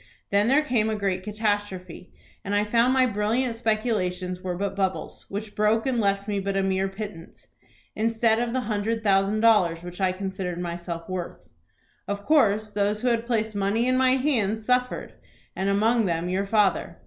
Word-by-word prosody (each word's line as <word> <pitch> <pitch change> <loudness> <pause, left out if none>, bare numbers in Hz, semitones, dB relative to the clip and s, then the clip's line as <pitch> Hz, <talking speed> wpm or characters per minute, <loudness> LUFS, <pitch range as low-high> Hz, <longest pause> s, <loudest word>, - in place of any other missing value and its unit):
Then 200 +2 +3
there 280 +5 +4
came 235 -6 +1
a 220 - -1
great 195 -3 -1
catastrophe, 205 -4 -3 0.3
and 200 0 -2
I 205 +1 +2
found 235 +3 +3
my 260 -1 +4
brilliant 230 +2 0
speculations 200 -6 -1
were 180 -2 -3
but 200 +1 -2
bubbles, 190 -1 -3
which 205 +1 -5
broke 215 +1 +2
and 260 -3 0
left 200 0 0
me 205 -1 -1
but 195 0 -2
a 195 - +1
mere 190 0 +1
pittance, 195 -4 -8 0.5
instead 225 0 +2
of 240 -1 -1
the 260 +1 0
hundred 220 0 -2
thousand 200 +1 +2
dollars 185 -7 +3
which 175 +2 -8
I 185 -1 +3
considered 185 -2 -4
myself 170 -1 -5
worth. 175 - -6 0.6
Of 200 0 -4
course 215 -8 +3
those 205 +1 0
who 250 - +3
had 235 0 0
placed 220 -2 0
money 205 +4 0
in 255 - +2
my 255 0 +4
hands 225 -6 0
suffered, 250 +1 0 0.4
and 190 +1 -1
among 220 +2 +2
them 170 0 -1
your 195 +2 -1
father. 195 -5 +1
205 Hz, 180 wpm, -25 LUFS, 190-225 Hz, 0.6 s, there